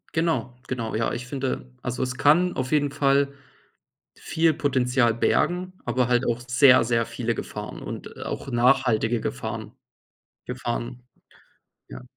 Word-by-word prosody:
Genau, 160 -8 0
genau. 115 -3 -3
Ja, 110 +1 0
ich 120 +1 -4
finde, 130 -2 -4
also, 125 +1 -2
es 125 0 -3
kann 175 +5 +4
auf 130 +2 -3
jeden 145 -2 +2
Fall 140 -1 +2 0.8
viel 160 0 +1
Potenzial 130 -5 +1
bergen, 180 +9 +1
aber 125 -1 +1
halt 125 0 +2
auch 120 0 0
sehr, 130 -1 +6
sehr 115 -1 +1
viele 120 0 -2
Gefahren - - -6
und, - - -7
äh, - - -10
auch - - -5
nachhaltige 120 -2 +2
Gefahren. 65 - -4 0.7
Gefahren. 125 0 -4 0.9
Ja. - - -10
125 Hz, 140 wpm, -25 LUFS, 120-140 Hz, 0.9 s, sehr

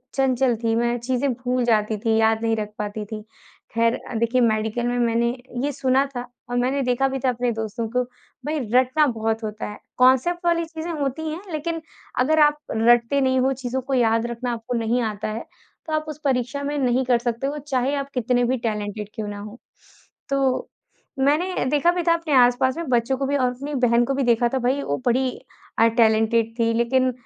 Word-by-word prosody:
चंचल 260 -2 +2
थी, 225 0 +2
मैं 240 +1 +1
चीज़ें 255 +3 0
भूल 250 +1 -1
जाती 215 -2 +2
थी, 225 +1 0
याद 220 0 +3
नहीं 225 0 +2
रख 210 -1 -3
पाती 210 0 -4
थी। 215 0 -7 0.5
खैर, 230 0 +2 0.2
देखिए 235 +2 +2
मेडिकल 220 +1 +1
में 245 - 0
मैंने 235 0 +2 0.4
ये 290 - 0
सुना 265 0 +2
था 245 - -2 0.3
और 245 - -1
मैंने 260 +3 +1
देखा 250 +2 +1
भी 270 0 -3
था - - +4
अपने 245 0 0
दोस्तों 220 +1 -3
को 250 +2 +1 0.4
भाई 305 +1 -1
रटना 260 +4 +4
बहुत 225 -2 -1
होता 215 0 -4
है। 210 - -8 0.2
कांसेप्ट 265 +8 +3
वाली 335 -1 +2
चीज़ें 320 +1 -6
होती 290 +3 -2
हैं, 320 +4 -5
लेकिन 325 +2 -3 0.4
अगर 310 +5 +3
आप 295 0 +1 0.2
रटते 235 +4 +4
नहीं 260 -1 +2
हो, 265 +1 +2
चीज़ों 260 0 -3
को 265 +2 -4
याद 230 -2 +2
रखना 240 +1 -3
आपको 230 +1 -4
नहीं 230 +2 0
आता 210 -2 -3
है, 220 +2 -5 0.4
तो 315 - -3
आप 310 0 0
उस 305 -1 -7
परीक्षा 255 0 0
में 290 +1 -2
नहीं 255 -1 +2
कर 250 -1 +3
सकते 235 +2 -2
हो, 290 - -3
चाहे 265 +1 0
आप 280 -1 -3
कितने 245 0 +1
भी 255 +2 +1
टैलेंटेड 210 -1 -3
क्यों 215 -1 -4
ना 205 0 -6
हो। 210 +3 -9 0.7
तो 270 -2 +1 0.5
मैंने 300 +7 +1
देखा 295 +4 +3
भी 355 0 -2
था 335 - +6
अपने 335 -3 -2
आस-पास 250 +2 +4
में 335 -4 -4
बच्चों 245 +2 +1
को 275 - -1
भी 285 +1 +1
और 255 -2 +2
अपनी 280 +4 -6
बहन 240 -2 +3
को 275 - -1
भी 275 - 0
देखा 240 -1 +3
था - - +2
भई 260 +3 0
वो 145 - -1
बड़ी 255 +1 +2 0.5
अ, 225 - +6
टैलेंटेड 225 0 +2
थी 230 0 +3
लेकिन 255 +3 +2
250 Hz, 205 wpm, -23 LUFS, 230-275 Hz, 0.7 s, था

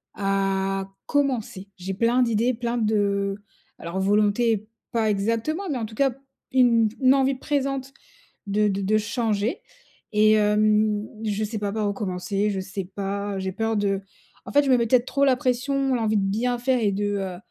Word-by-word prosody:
à 195 -1 0 0.2
commencer. 250 -9 -1
J'ai 190 +1 -4
plein 235 +5 +2
d'idées, 230 +1 +1
plein 240 0 -2
de 220 -2 +1
heu, 200 -1 0 0.4
alors 170 +3 -4
volonté 210 +2 +2 0.2
pas 225 -3 +1
exactement, 230 - -1
mais 280 - -1
en 225 - -2
tout 220 - -12
cas, 270 +3 +2 0.4
une 235 -3 +4
une 260 0 +6
envie 270 0 +2
présente 275 -1 -2 0.5
de 210 +1 +2
de 195 0 -2
de 210 +3 +2
changer 215 0 -1 0.5
et 215 0 +5
hem, 210 0 +2 0.2
je 210 0 -1
sais 215 +1 -4
pas 205 -1 -2
par 215 -1 0
où - - -1
commencer, 195 +1 -2
je 195 - -2
sais 195 0 -5
pas, 200 +1 -4
j'ai 190 0 -3
peur 225 +2 -1
de 200 -1 0 0.4
en - - -7
fait, 290 +1 +5
je - - 0
mets 255 - +6
peut-être 235 +1 +3
trop 275 +1 0
la 265 -2 +4
pression, 270 +1 0
l'envie 220 -2 +1
de 200 - +1
bien 235 +5 0
faire 255 +1 +1
et 210 -3 +1
de, 205 +1 -1
heu, 190 -2 -4
215 Hz, 180 wpm, -24 LUFS, 200-245 Hz, 0.5 s, une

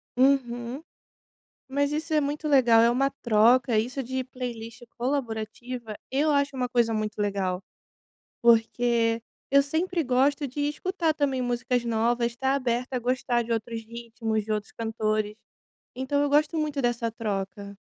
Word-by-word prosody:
Uhum. 250 0 +1 0.9
Mas 285 +2 0
isso 310 +1 -2
é 305 - +4
muito 295 +2 -2
legal, 245 -6 +6
é 235 - +5
uma 270 +3 +2
troca. 235 -1 +3
Isso 245 +5 -1
de 260 +2 -3
playlist 240 -3 -7
colaborativa, 240 -2 -3 0.2
eu 295 +3 +2
acho 280 -1 +1
uma 250 -1 -1
coisa 235 -2 +2
muito 215 0 -2
legal. 195 -3 -1 0.8
Porque 230 0 +3 0.3
eu 280 +1 +6
sempre 330 +5 -1
gosto 275 +3 +2
de 275 +3 -5
escutar 335 +2 -1
também 275 -4 0
músicas 245 0 0
novas, 235 +1 +1
estar 265 +3 0
aberta 255 -1 -1
a - - +1
gostar 245 0 0
de 230 - -3
outros 225 0 -3
ritmos, 225 -1 -3
de 215 - -2
outros 210 -1 -3
cantores. 215 -2 -1 0.6
Então 265 +3 0
eu 290 - +1
gosto 300 +3 +2
muito 300 -3 -1
dessa 235 -1 0
troca. 200 -2 -4
245 Hz, 145 wpm, -26 LUFS, 225-275 Hz, 0.9 s, legal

